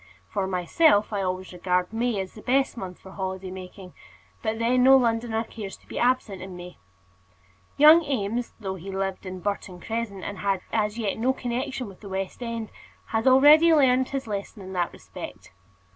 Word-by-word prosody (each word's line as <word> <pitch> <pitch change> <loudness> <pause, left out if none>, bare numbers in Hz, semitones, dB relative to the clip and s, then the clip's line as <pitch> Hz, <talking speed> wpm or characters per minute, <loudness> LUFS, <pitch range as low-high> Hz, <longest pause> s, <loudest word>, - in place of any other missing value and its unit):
For 195 -2 -2
myself, 205 - +3
I 200 - 0
always 185 0 -3
regard 180 +2 0
May 230 -2 0
as 190 -1 -5
the 215 - -11
best 265 +3 +1
month 185 -6 -7
for 190 - -13
holiday 190 -1 -4
making; 185 0 -10 0.5
but 220 0 -1
then 240 +2 +2
no 265 +1 +8
Londoner 230 -2 0
cares 215 -3 -8
to - - -26
be - - -5
absent 240 -6 +1
in 185 -1 -8
May. 175 0 -10 1.0
Young 310 +3 +8
Eames, 240 -5 -2
though 195 -3 -4
he 190 +1 -8
lived 195 0 -3
in 185 0 -6
Burton 200 -2 -3
Crescent 220 -2 -4
and 200 - -5
had 195 -2 0
as 210 0 0
yet 215 -2 -2
no 255 +3 +2
connection 250 0 -3
with 195 -2 -12
the 200 - -10
West 190 +4 -4
End, 230 -2 -4 0.4
had 225 +2 0
already 295 +6 +7
learned 260 -3 +4
his 275 -1 -3
lesson 205 -1 -5
in 190 0 -8
this 175 -2 +1
respect. - - -10
210 Hz, 185 wpm, -26 LUFS, 190-245 Hz, 1.0 s, no